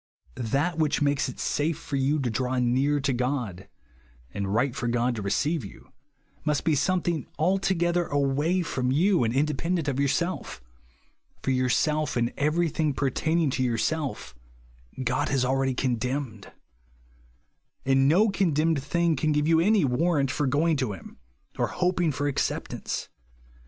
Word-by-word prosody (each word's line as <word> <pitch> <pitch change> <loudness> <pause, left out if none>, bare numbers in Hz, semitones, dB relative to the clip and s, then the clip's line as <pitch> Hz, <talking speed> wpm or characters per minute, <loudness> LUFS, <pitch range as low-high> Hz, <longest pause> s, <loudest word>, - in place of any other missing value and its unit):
That 145 - -1
which 155 -2 +2
makes 145 -2 +1
it 125 - -9
safe 150 +2 0
for 150 -3 -6
you 135 +3 +1
to 125 -3 -1
draw 125 +3 -1
near 130 +4 +2
to 140 -1 0
God, 120 -7 -2 0.7
and 100 -1 -3
right 120 +4 +1
for 130 -4 -2
God 120 +1 +1
to 110 - -5
receive 145 +9 0
you, 100 - -12 0.5
must 150 -2 0
be 160 - +2
something 175 -1 0
altogether 175 0 +1
away 145 +6 +1
from 130 -6 -2
and 150 - +2
independent 150 +5 0
of 140 -1 -1
yourself; 170 - -1 0.8
for 135 - 0
yourself 135 +3 +1
and 120 0 0
everything 155 -1 0
pertaining 155 +3 0
to 130 - -1
your 120 -2 0
self, 145 - -2 0.7
God 125 +1 0
has 135 -2 +1
already 135 0 +1
condemned; 125 -3 -2 1.3
and 135 0 +4
no 195 +9 +4
condemned 165 -6 +1
thing 170 +3 +1
can 155 +3 0
give 150 0 +1
you 165 0 +4
any 200 0 +3
warrant 140 +1 +1
for 145 - -1
going 155 +4 +2
to 125 -6 -1
him, 95 - -11 0.4
or - - +2
hoping 180 -2 0
for 145 +1 -2
acceptance. 140 - -3
145 Hz, 145 wpm, -26 LUFS, 130-165 Hz, 1.3 s, and